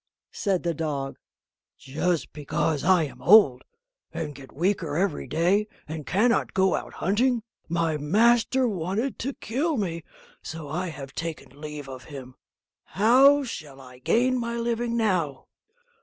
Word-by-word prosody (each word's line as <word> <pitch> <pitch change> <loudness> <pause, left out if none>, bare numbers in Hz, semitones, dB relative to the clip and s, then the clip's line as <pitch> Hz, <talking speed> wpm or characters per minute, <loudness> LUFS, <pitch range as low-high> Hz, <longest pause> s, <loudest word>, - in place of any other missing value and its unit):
said 195 -4 -1
the 170 -1 0
dog, 145 -4 -3 0.6
"just 150 +2 -2
because 150 0 -1
I 180 -2 +4
am 145 - -7
old, 170 - +6 0.5
and 160 -3 -4
get 135 -2 -13
weaker 165 -2 -1
every 185 -4 -1
day, 185 +6 +2 0.2
and 155 -1 -6
cannot 230 +6 +2
go 190 0 +3
out - - -4
hunting, 235 +5 +1 0.3
my 165 -2 0
master 235 - +3
wanted 200 +6 -2
to 270 +3 -3
kill 285 +7 -1
me, 170 -6 -2 0.4
so 160 -2 -7
I 175 +6 -3
have 140 -4 -8
taken 160 -3 -6
leave 150 -2 -7
of 130 -1 -9
him; 135 -4 -9
but - - -36
how 270 +6 +6
shall 150 - -7
I 125 -1 -14
gain 250 - +2
my 235 0 -3
living 235 0 -1
now?" 180 - 0
170 Hz, 145 wpm, -26 LUFS, 150-225 Hz, 0.6 s, old